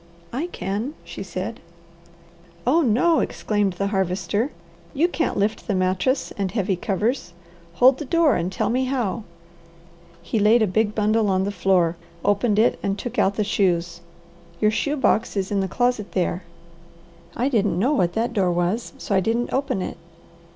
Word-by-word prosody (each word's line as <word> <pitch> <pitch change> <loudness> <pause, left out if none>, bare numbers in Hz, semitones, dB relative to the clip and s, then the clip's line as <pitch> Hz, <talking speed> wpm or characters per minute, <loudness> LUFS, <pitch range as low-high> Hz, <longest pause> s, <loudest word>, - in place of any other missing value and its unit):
"I 290 +8 -2
can," 225 - -4
she - - -8
said. - - -5 1.1
"Oh 335 - +4
no!" 295 +6 +3
exclaimed 205 -3 0
the 195 +3 -2
Harvester. 190 +5 0 0.5
"You 315 +5 +3
can't 335 -2 -1
lift 205 +2 -1
the 205 - 0
mattress 185 +8 0
and 195 -1 0
heavy 195 -2 0
covers. 205 +3 -1 0.4
Hold 255 +7 +5
the 300 - -4
door 330 -1 +3
and 175 +2 -1
tell 195 - -1
me 255 +2 +1
how." 240 -5 -2 1.0
He 220 - -1
laid 220 +3 +5
a - - +4
big 210 +2 0
bundle 215 0 +2
on 190 0 +2
the 200 - -1
floor, 180 -3 +2 0.3
opened 205 +1 +2
it, 225 +3 +3
and 195 0 -1
took 240 +3 -4
out 195 +1 +2
the 215 - +1
shoes. 175 -4 0 0.6
"Your 215 - +3
shoe 290 +7 -1
box 230 -5 +1
is 195 0 -1
in 200 - +1
the 190 - 0
closet 245 +1 -1
there." 180 -1 0 0.9
"I 245 - +1
didn't 210 -9 +1
know 250 +11 +2
what 175 -11 +1
that 235 +2 -1
door 190 -5 +2
was, 175 +7 -1
so - - -4
I 195 - +4
didn't 230 +5 -1
open 265 -8 0
it." - - -6
210 Hz, 170 wpm, -23 LUFS, 190-245 Hz, 1.1 s, Hold